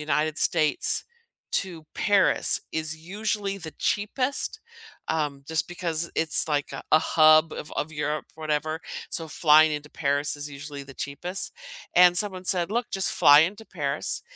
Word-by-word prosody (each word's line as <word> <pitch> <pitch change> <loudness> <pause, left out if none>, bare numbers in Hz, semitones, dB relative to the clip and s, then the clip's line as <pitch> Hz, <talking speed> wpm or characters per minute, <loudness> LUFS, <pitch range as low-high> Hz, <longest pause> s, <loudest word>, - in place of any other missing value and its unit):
United 150 +1 0
States 155 -3 +1 0.5
to 170 -5 -2
Paris 200 -2 +2
is 160 0 -2
usually 200 +3 -3
the 160 -4 -7
cheapest, 255 - -1 0.5
um, 145 -3 -2
just 160 0 0
because 170 -2 -2
it's 160 -1 +3
like 145 -2 -1
a - - -6
a 155 - +8
hub 155 0 +5
of 150 - -7
of 155 - -2
Europe, 150 0 -3
whatever, 155 0 -2 0.3
so, 165 - -3
flying 155 +1 +5
into 150 0 -5
Paris 145 -1 -1
is 145 0 -5
usually 145 0 -8
the 135 - -13
cheapest. 175 +9 -4 0.4
And 180 0 +6
someone 190 -3 -2
said, 180 -1 0
"Look, 235 +2 -2
just 195 -1 0
fly 145 +1 +7
into 200 +7 -1
Paris, 145 -6 -3
160 Hz, 150 wpm, -25 LUFS, 150-180 Hz, 0.5 s, a